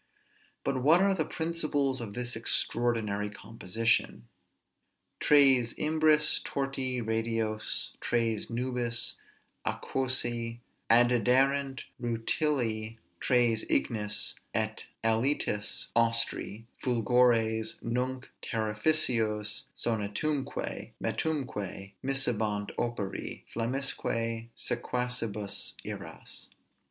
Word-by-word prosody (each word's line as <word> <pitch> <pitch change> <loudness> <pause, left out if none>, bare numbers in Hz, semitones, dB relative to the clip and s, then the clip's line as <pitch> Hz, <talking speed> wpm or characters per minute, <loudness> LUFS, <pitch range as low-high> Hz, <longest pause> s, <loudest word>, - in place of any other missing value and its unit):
But 135 -2 -1
what 155 +7 +6
are 195 +1 +4
the 160 -5 0
principles 155 -5 -1
of 105 -3 -6
this 125 -1 -2
extraordinary 115 -3 0
composition? 115 - -1 0.9
Tres 135 -5 +5
imbris 155 -1 +4
torti 135 -3 -2
radios, 110 -1 -1
tres 115 -2 0
nubis 120 0 +1 0.5
aquosæ 120 -3 0 0.3
Addiderant; 130 +4 +3 0.2
rutili 115 -2 -1 0.2
tres 120 -3 +3
ignis, 105 -3 +1 0.2
et - - -1 0.2
alitis 115 -2 0
austri: 115 -2 +2 0.2
Fulgores 115 -2 +2
nunc 125 +2 -2 0.2
terrificos, 110 -2 +1
sonitumque, 115 +6 -2
metumque 105 - -3
Miscebant 110 -6 0
operi, 115 -5 -3
flammisque 115 -2 -1
sequacibus 120 -5 -2
iras. - - -7
120 Hz, 75 wpm, -30 LUFS, 110-130 Hz, 0.9 s, what